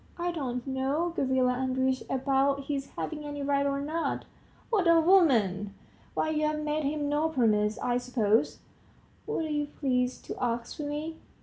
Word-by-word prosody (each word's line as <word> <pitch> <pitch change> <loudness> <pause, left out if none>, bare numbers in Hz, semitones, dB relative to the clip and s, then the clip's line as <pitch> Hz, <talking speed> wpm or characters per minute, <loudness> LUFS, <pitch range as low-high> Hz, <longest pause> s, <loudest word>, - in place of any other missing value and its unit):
"I 350 0 -1
don't 250 -7 -3
know, 275 +6 -1
Gavrila 260 -3 +2
Andreitch, 260 0 0
about 275 +1 +1
his 275 -1 -3
having 300 -2 -4
any 290 -1 -5
right 280 0 +2
or 275 0 0
not." 320 +3 -2 0.5
"What 395 -6 +3
a 335 0 +7
woman! 230 - +3 0.4
why, 315 - +1
you've 305 0 0
made 300 0 -1
him 290 0 -1
no 295 +2 +1
promise, 215 -7 +2
I 245 0 0
suppose.. 235 -3 +1 0.3
." - - -32
"What 325 - -1
are - - -4
you 295 -1 0
pleased 255 -3 -1
to - - -5
ask 235 +1 -2
of 295 - -3
me?" 305 +2 -4
280 Hz, 170 wpm, -29 LUFS, 250-305 Hz, 0.5 s, a